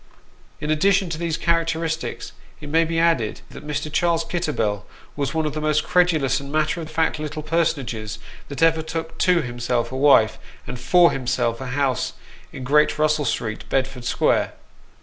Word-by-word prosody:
In 150 - -2
addition 190 +3 +2
to 160 - -3
these 165 -2 -1
characteristics, 165 -1 -1 0.3
it 145 - -9
may 165 +2 +3
be 165 0 -2
added 165 -10 +1
that 150 - -10
Mr. 150 0 -3
Charles 170 -1 +2
Kitterbell 150 - -1 0.3
was 145 +2 -2
one 160 -1 +1
of 150 - -2
the 155 - -4
most 150 0 +1
credulous 160 -7 +2
and 140 0 -8
matter 155 +3 0
of 160 - -7
fact 160 0 0
little 155 0 -5
personages 140 -10 -1 0.3
that 140 +3 -3
ever 160 -1 +4
took 160 0 -6
to 180 -2 +3
himself 120 0 -2
a - - -5
wife, 130 -6 +4 0.3
and 125 0 -6
for 175 +7 +5
himself 120 -2 -1
a 130 - -5
house 130 0 -1 0.4
in 130 - -8
Great 150 +4 +3
Russell 155 -1 +2
Street, 110 -2 -3
Bedford 130 -2 -1
Square. - - +1
155 Hz, 170 wpm, -22 LUFS, 130-165 Hz, 0.4 s, for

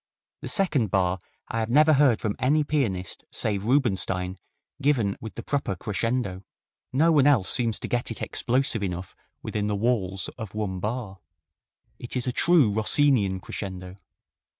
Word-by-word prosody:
The - - -5
second 160 - +2
bar 95 -1 +1 0.3
I 115 - -2
have 110 0 -2
never 155 +5 +5
heard 135 -5 +4
from 105 -1 -1
any 150 +4 +3
pianist 110 - -2
save 100 -2 -2
Rubinstein 95 -7 0 0.4
given 125 -9 +2
with 110 - -8
the - - -6
proper 140 -9 -1
crescendo. 105 0 -2 0.5
No 160 +6 +3
one 145 -3 +5
else 130 -10 +4
seems 115 -3 +1
to - - -4
get 120 0 -1
it 115 - -5
explosive 125 -2 0
enough 90 -2 -4 0.3
within 105 -1 -2
the 105 - 0
walls 100 -4 -1
of 110 -3 -7
one 100 -4 -2
bar. 105 -1 -4 0.8
It 120 - -8
is 125 - +1
a 125 - 0
true 165 -10 +4
Rossin 135 +7 +4
ian 95 -5 -1
crescendo. 95 -1 -7
110 Hz, 160 wpm, -26 LUFS, 95-135 Hz, 0.8 s, never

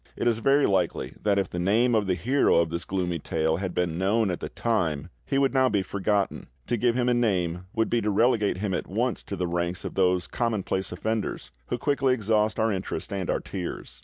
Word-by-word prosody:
It - - -1
is 115 -2 +2
very 135 +4 +4
likely 95 -3 0
that 100 -1 +2
if 95 -1 +1
the 90 - -3
name 110 +7 +3
of 105 -3 +2
the 90 - +2
hero 130 +9 +2
of 85 -1 +2
this 85 0 -3
gloomy 90 -3 -2
tale 80 +1 0
had 95 0 -3
been 85 -1 -1
known 100 +2 +2
at 90 - -3
the - - -5
time, 85 -9 -1 0.2
he 135 - 0
would 135 -1 +2
now 130 -1 +4
be 100 -4 +1
forgotten. 100 +1 -1 0.2
To - - 0
give 120 +1 +1
him 125 -1 +1
a 125 - +4
name 90 -7 0
would 115 0 +2
be 120 - +1
to 105 - 0
relegate 105 -1 +2
him 100 0 -2
at - - -2
once 115 +5 -1
to 100 - -6
the 90 -1 -1
ranks 85 +1 -2
of - - -4
those 90 -2 +2
commonplace 100 -5 -1
offenders 110 +4 -3 0.2
who - - -2
quickly 135 -2 +2
exhaust 110 -1 +1
our 110 0 +2
interest 95 +2 -4
and 95 -3 -3
our - - 0
tears. 90 -3 -6
100 Hz, 225 wpm, -26 LUFS, 90-115 Hz, 0.2 s, very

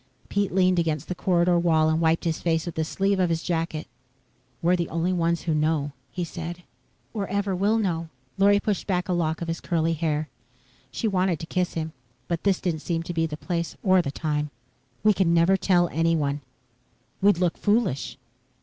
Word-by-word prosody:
Pete 200 -1 0
leaned 185 -1 +3
against 155 -4 -1
the - - 0
corridor 175 -1 +2
wall 160 -2 +3
and 160 +1 +1
wiped 165 0 +2
his 165 -2 -1
face 165 -2 +1
with 170 - -4
the 160 - -1
sleeve 195 +4 0
of 180 -2 +2
his 165 0 -1
jacket. 165 -2 -2 0.7
"We're 175 +5 +3
the 170 -2 -2
only 170 +3 0
ones 170 -1 0
who 165 - 0
know," 150 -1 +1 0.2
he 175 +8 -4
said. 170 +1 -6 0.5
"Or 205 -4 -2
ever 200 0 -1
will 205 +4 +2
know." 170 -6 -1 0.3
Lorry 200 +1 +5
pushed 205 -1 -2
back 180 -3 0
a 185 - 0
lock 160 -1 0
of - - -5
his 165 0 -3
curly 165 -1 0
hair. 155 -1 -1 0.6
She 225 - -2
wanted 185 -5 +1
to - - -5
kiss 180 +1 -1
him, 160 -1 -3 0.3
but 170 +1 -3
this 195 -2 +3
didn't 165 -4 -2
seem 165 0 -2
to 175 +1 -5
be 165 -1 +1
the 150 -1 -6
place 170 0 -3
or 185 -2 +5
the 165 - -3
time. 150 0 -2 0.5
"We 215 0 +6
can 175 -3 +2
never 170 +3 +5
tell 180 -2 +3
anyone." 155 -3 +1 0.8
"We'd 200 -2 +5
look 175 -1 +1
foolish." 205 - 0
170 Hz, 195 wpm, -25 LUFS, 160-185 Hz, 0.8 s, We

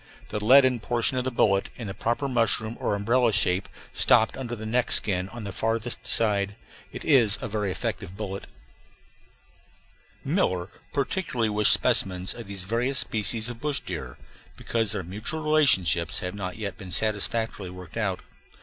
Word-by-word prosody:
The 105 - -4
leaden 130 +1 +6
portion 120 +3 0
of 125 - -3
the - - +1
bullet, 100 -5 +2
in 115 - -7
the 95 - -5
proper 120 +7 -1
mushroom 115 -2 0
or - - 0
umbrella 115 +4 +2
shape, 95 -2 +1 0.2
stopped 110 - +3
under 120 -3 -5
the 110 -1 -8
neck 120 +2 0
skin 95 -2 +1
on 120 0 -8
the 100 - -5
farther 115 +3 -1
side. 100 -3 +1 0.4
It - - -8
is 120 -9 +5
a - - -4
very 105 -2 -2
effective 90 0 -4
bullet. 100 -2 -5 1.8
Miller 90 0 0 0.2
particularly 140 - -1
wished 105 0 +3
specimens 95 0 +2
of 120 -3 -9
these 100 -2 -4
various 120 +7 -1
species 110 -1 +1
of 120 -1 -6
bush 150 -2 -1
deer, - - -6 0.4
because 115 -3 0
their 100 -3 -1
mutual 110 - -4
relationships 95 - +3
have 90 0 -4
not 95 -2 -5
yet 100 -3 -5
been 95 -3 -8
satisfactorily 110 -1 0
worked 90 -2 -11
out. 100 -5 -1
110 Hz, 160 wpm, -26 LUFS, 100-120 Hz, 1.8 s, leaden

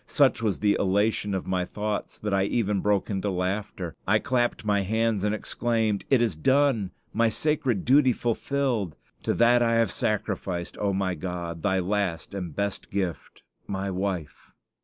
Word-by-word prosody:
Such 140 -5 +3
was 105 -4 0
the 105 -1 +2
elation 100 +1 +1
of 95 - -3
my 95 -1 0
thoughts 105 +3 -3
that 105 -1 -3
I 95 0 +3
even 105 -2 0
broke 105 +1 +1
into 100 +1 -1
laughter. 95 0 -3
I 105 +2 +5
clapped 120 -2 0
my 100 -1 +2
hands 110 +1 0
and 105 0 +1
exclaimed, 110 -2 -1
"It 130 -4 +4
is 110 -8 0
done! 130 - +2 0.2
My 115 +1 +3
sacred 130 - 0
duty 130 +1 +5
is 120 - 0
fulfilled! 120 - -1 0.3
To - - 0
that 120 +1 +5
I 115 -1 +3
have 115 0 +2
sacrificed, 95 -4 -2
O 100 -1 +1
my 95 -1 0
God, 85 -1 -5
Thy 95 +1 +1
last 95 -2 -1
and 90 -6 -5
best 100 0 -3
gift, 95 -4 -4 0.2
my 95 0 -2
wife!" 90 -5 -4
105 Hz, 170 wpm, -26 LUFS, 95-115 Hz, 0.3 s, I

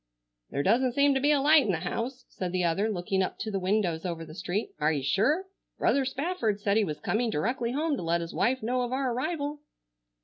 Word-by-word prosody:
"There 140 - -1
doesn't 240 - +3
seem 280 +1 +4
to 270 - +1
be 285 +2 +2
a 290 - +4
light 300 +2 +6
in 210 - 0
the 160 - -2
house," 240 +8 -4
said 180 -2 -4
the 180 -1 +1
other, 175 +6 +1
looking 190 -1 -1
up 185 - -2
to 220 - -4
the 195 - -1
windows 185 -3 0
over 170 -3 -4
the 155 - -11
street. 185 +5 -3
"Are 150 +1 +3
you 145 -4 -1
sure? 240 - +2 0.3
Brother 275 -1 +2
Spafford 265 - -1
said 200 0 +1
he 220 - +4
was 150 -6 -3
coming 230 +1 0
directly 235 - -1
home 305 +2 0
to - - -4
let 170 0 0
his 165 - -6
wife 255 0 +1
know 250 +3 0
of 245 0 -2
our 260 -1 0
arrival." 290 +2 -2
220 Hz, 235 wpm, -28 LUFS, 180-265 Hz, 0.3 s, light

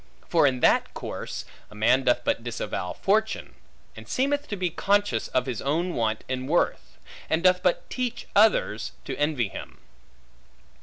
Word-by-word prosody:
For 165 -4 +4
in 130 -2 0
that - - +3
course, - - -5 0.2
a 105 - -14
man 120 +5 +3
doth 120 0 +3
but 115 - 0
disavow 110 -6 -4
fortune; 220 +3 0 0.4
and - - -11
seemeth 285 +3 0
to 205 - -3
be 180 -3 -1
conscious 200 - +1
of 130 -1 0
his 125 -5 -4
own 170 +6 0
want 110 -2 -1
in 130 0 -3
worth; 170 +4 0 0.3
and 160 +2 +1
doth 180 0 +5
but 180 -2 +1
teach 250 -2 -3
others, 200 - +3
to - - -4
envy 145 -8 0
him. - - -9
150 Hz, 160 wpm, -26 LUFS, 120-195 Hz, 0.4 s, doth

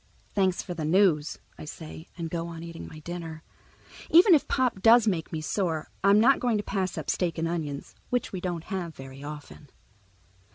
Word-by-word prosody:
"Thanks 190 -3 +1
for 180 - -5
the 165 -2 -4
news," 160 -2 +3 0.2
I - - -7
say 160 +1 -9
and 165 -2 -4
go 170 -1 -2
on 165 -1 -7
eating 170 -1 -8
my 155 - -11
dinner. 165 -1 -6 0.7
Even 355 +3 +8
if 300 - +4
Pop 250 -7 +1
does 230 +1 +7
make 175 -6 0
me 160 -2 -3
sore, 160 -2 -2
I'm 200 +1 +6
not 260 +5 +5
going 240 -3 +1
to 205 - -2
pass 190 -3 -2
up - - -4
steak 175 -3 0
and 165 0 0
onions, 155 -4 -4 0.2
which 245 -4 -1
we 185 - -4
don't 175 -3 -3
have 175 -5 -4
very 135 +1 -10
often. 145 0 -9
170 Hz, 195 wpm, -27 LUFS, 160-200 Hz, 0.7 s, Even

